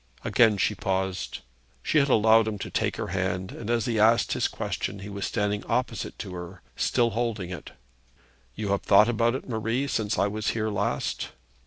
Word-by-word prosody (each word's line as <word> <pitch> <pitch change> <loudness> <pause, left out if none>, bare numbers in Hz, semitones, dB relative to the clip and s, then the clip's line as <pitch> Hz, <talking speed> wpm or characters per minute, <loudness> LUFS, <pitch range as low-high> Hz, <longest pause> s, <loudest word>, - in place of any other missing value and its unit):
Again 110 -3 +4
she 105 - +2
paused. 95 -2 -2 0.4
She 155 - +3
had 140 0 +2
allowed 110 -1 +5
him 110 -2 -2
to - - -6
take - - 0
her - - -3
hand, 95 0 -2
and 115 - -7
as 120 -1 +1
he 120 -3 0
thus 110 +2 +7
asked 115 - -1
his - - +1
question 100 +1 -4
he 100 - -7
was 100 -1 -3
standing 105 -2 -1
opposite 120 -4 -2
to 95 -3 -6
her, 90 +1 -8
still 120 -2 +2
holding 110 -6 -2
it. 90 - -8 0.8
'You 105 -1 -3
have 100 0 +1
thought 105 +3 +5
about 115 +1 +2
it, - - -6
Marie, 115 +3 -1
since 110 -6 -1
I - - +3
was 105 +1 -3
here 110 -1 0
last?' 100 0 -2
105 Hz, 195 wpm, -26 LUFS, 100-115 Hz, 0.8 s, thus